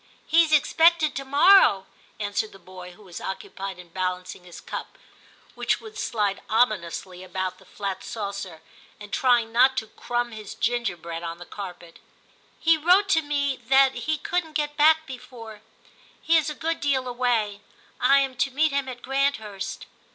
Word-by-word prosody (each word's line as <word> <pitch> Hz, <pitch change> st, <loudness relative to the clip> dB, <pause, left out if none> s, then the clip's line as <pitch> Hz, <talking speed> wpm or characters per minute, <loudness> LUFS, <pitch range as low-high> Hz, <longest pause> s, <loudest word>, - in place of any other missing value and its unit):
' -, -, -34 dB
He 330 Hz, +2 st, +5 dB
is 315 Hz, -, -3 dB
expected 320 Hz, +1 st, +4 dB
to 275 Hz, -, -4 dB
morrow,' 280 Hz, -, +6 dB, 0.3 s
answered 205 Hz, +1 st, -2 dB
the -, -, -12 dB
boy, 180 Hz, 0 st, -11 dB
who 210 Hz, -, -18 dB
was 180 Hz, -3 st, -9 dB
occupied 190 Hz, 0 st, -6 dB
in 180 Hz, -1 st, -13 dB
balancing 180 Hz, 0 st, -4 dB
his 175 Hz, -, -11 dB
cup, -, -, -7 dB, 0.6 s
which -, -, 0 dB
would 435 Hz, -1 st, -12 dB
slide 210 Hz, -, -1 dB
ominously 185 Hz, -5 st, 0 dB
about 185 Hz, 0 st, -4 dB
the 190 Hz, -, -19 dB
flat 195 Hz, -1 st, -5 dB
saucer, 200 Hz, -6 st, -6 dB, 0.4 s
and 210 Hz, -1 st, -11 dB
trying 240 Hz, -5 st, +3 dB
not 255 Hz, +3 st, +4 dB
to 220 Hz, -, -1 dB
crumb 240 Hz, +2 st, -3 dB
his 215 Hz, -2 st, -9 dB
ginger 235 Hz, -5 st, -1 dB
bread 165 Hz, 0 st, -6 dB
on 170 Hz, 0 st, -5 dB
the 175 Hz, -, -10 dB
carpet. 180 Hz, -4 st, -9 dB, 0.3 s
* -, -, -34 dB
He 330 Hz, 0 st, +4 dB
wrote 365 Hz, +6 st, +4 dB
to 320 Hz, -4 st, +4 dB
me 285 Hz, -2 st, -1 dB
that 265 Hz, +2 st, +4 dB
he 310 Hz, 0 st, -2 dB
couldn't 325 Hz, +1 st, -2 dB
get 295 Hz, -1 st, -2 dB
back 315 Hz, +1 st, +5 dB
before; 245 Hz, -5 st, -10 dB, 0.6 s
he 330 Hz, -, +2 dB
is 315 Hz, -2 st, +3 dB
a 300 Hz, -, -5 dB
good 325 Hz, +2 st, -2 dB
deal 265 Hz, -3 st, 0 dB
away; 240 Hz, -5 st, 0 dB, 0.4 s
I 275 Hz, +2 st, +5 dB
am 270 Hz, -1 st, -1 dB
to 245 Hz, +2 st, +1 dB
meet 300 Hz, +3 st, +1 dB
him 275 Hz, -1 st, -1 dB
at 245 Hz, -1 st, -9 dB
Granthurst.' 255 Hz, -8 st, -2 dB
240 Hz, 175 wpm, -25 LUFS, 195-285 Hz, 0.6 s, morrow